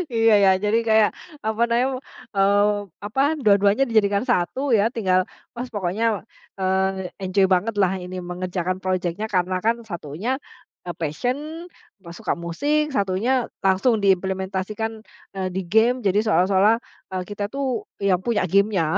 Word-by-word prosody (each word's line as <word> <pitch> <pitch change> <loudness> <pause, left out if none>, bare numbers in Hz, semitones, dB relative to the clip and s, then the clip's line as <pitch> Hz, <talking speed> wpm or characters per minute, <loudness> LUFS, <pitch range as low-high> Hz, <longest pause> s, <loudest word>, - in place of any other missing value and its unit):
Iya 225 -1 +5
ya, - - +6
jadi 210 +2 +2
kayak, 220 -1 +5 0.4
apa 220 +1 -1
nam 255 +2 +1 0.3
eee, 200 +1 +4 0.4
apa 225 +6 -1 0.2
dua-duanya 205 +3 +4
dijadikan 205 -2 +2
satu 245 +4 0
ya, 210 +2 +3
tinggal, 185 -5 +2 0.4
pas 245 +2 -4
pokoknya, 205 +2 -1 0.5
eee, 190 0 0
enjoy 190 +1 +3
banget 205 +5 0
lah 190 -2 +3
ini, 180 +1 -7
mengerjakan 180 0 -3
project-nya 185 +2 -1
karena 185 -1 0
kan 230 +1 +3
satunya, 170 - -5 0.6
e - - -1
passion, 165 - -1 0.6
apa 170 -2 -11
suka - - -1
musik, 295 - 0
satunya 215 +6 +1 0.2
langsung 205 +4 +3
diimplementasikan, 190 +3 -1 0.4
eee, 190 -1 -1
di 190 - 0
game, 225 +6 +3
jadi 195 +1 +3
seolah-olah, 195 +2 +4 0.4
e - - -3
kita 205 0 -3
tuh 265 -4 -2 0.2
yang 195 -2 +2
punya 235 -6 +1
game-nya. 195 -4 +2
200 Hz, 140 wpm, -23 LUFS, 185-225 Hz, 0.6 s, ya